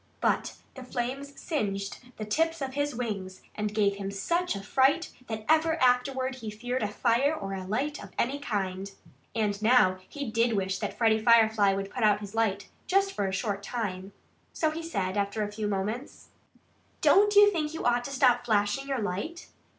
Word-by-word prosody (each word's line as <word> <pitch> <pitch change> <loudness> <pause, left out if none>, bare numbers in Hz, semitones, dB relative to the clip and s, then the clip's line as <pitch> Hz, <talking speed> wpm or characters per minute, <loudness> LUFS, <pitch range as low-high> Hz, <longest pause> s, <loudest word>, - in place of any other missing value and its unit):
But - - 0 0.2
the 260 - -9
flames 260 +3 -4
singed 200 - -2 0.2
the 215 - -4
tips 325 +9 0
of 265 -2 -4
his 285 -1 -1
wings 200 -6 -4
and 210 0 -2
gave 205 -2 +1
him 195 -1 -4
such 335 - -1
a 195 - -6
fright 270 - +2 0.2
that 220 -1 -5
ever 320 +1 +4
afterward 260 +1 +2
he 225 -4 -6
feared 245 +4 -3
a 210 - +1
fire 240 +7 +1
or 195 -8 -5
a 190 -1 -5
light 275 +10 -2
of - - -10
any 275 +4 0
kind. 195 -6 -3 0.5
And 210 -2 0
now 215 -5 +4
he 285 -6 -5
did 230 +1 +2
wish 190 -2 -1
that - - -4
Freddie 220 -2 +3
Firefly 220 -4 +5
would 195 0 -4
put 250 - -5
out 210 -1 +4
his 205 -1 -8
light, 205 -3 0 0.2
just 390 +1 +2
for 200 - -1
a - - -2
short 200 +1 -2
time. 200 -4 -4 0.4
So 315 -1 +1
he 320 +2 -5
said, 195 - -2
after 200 +2 0
a 205 - -4
few 210 0 -3
moments: 210 +7 -4 0.7
"Don't 415 +1 +5
you 410 0 +8
think 315 -4 -2
you - - -5
ought 240 0 +2
to - - -5
stop 255 -3 +3
flashing 215 +3 +1
your 270 -4 -1
light?" 205 - -4
225 Hz, 190 wpm, -28 LUFS, 200-275 Hz, 0.7 s, you